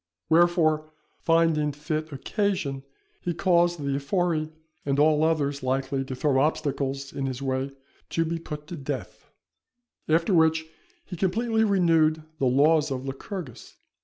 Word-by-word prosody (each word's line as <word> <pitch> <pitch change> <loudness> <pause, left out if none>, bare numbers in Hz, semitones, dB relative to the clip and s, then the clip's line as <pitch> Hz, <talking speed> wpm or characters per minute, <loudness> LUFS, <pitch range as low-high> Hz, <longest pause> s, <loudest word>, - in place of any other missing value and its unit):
Wherefore, 160 -2 +3 0.3
finding 165 -3 +2
fit 155 +2 -4
occasion, 145 -2 -2 0.4
he 175 -2 -2
caused 175 -1 +3
the 140 -1 -1
Ephori 155 +1 0 0.3
and 140 -1 0
all 150 +1 +4
others 145 -3 +1
likely 135 +1 -1
to 130 - -5
throw 135 0 +1
obstacles 140 -2 -1
in 135 -1 -2
his 130 -1 -4
way, 135 0 -1 0.4
to 165 - 0
be 165 +1 -2
put 150 -2 -7
to 175 - -5
death; 140 -4 -6 0.8
after 165 +5 +3
which, 160 -1 +3 0.4
he 180 - -7
completely 220 +5 +1
renewed 165 -6 +3 0.2
the 135 - +2
laws 150 +4 +4
of 130 -1 -4
Lycurgus. 135 - -7
155 Hz, 135 wpm, -26 LUFS, 140-170 Hz, 0.8 s, all